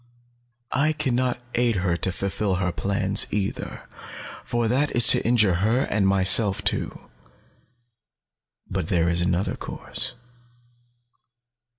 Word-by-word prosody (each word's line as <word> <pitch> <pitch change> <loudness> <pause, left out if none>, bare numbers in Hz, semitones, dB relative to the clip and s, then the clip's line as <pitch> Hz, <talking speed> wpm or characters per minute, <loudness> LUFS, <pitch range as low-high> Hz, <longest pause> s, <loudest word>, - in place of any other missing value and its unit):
I 155 +4 +2
can 150 -4 -2
not 125 0 0
aid 120 -2 +1
her 90 -2 0
to 95 +2 -1
fulfill 100 +1 -2
her 90 0 -1
plans, 100 +1 +1
either, 100 -1 -4 0.6
for 120 -1 -1
that 135 +5 +1
is 120 - +6
to - - +5
injure 110 -6 +3
her 115 +5 +2
and 100 -6 0
myself 95 +1 +3
too. - - -3 1.6
But 90 -4 -3
there 85 -1 +1
is 85 0 0
another 90 +1 0
course. - - -6
100 Hz, 120 wpm, -24 LUFS, 95-120 Hz, 1.6 s, is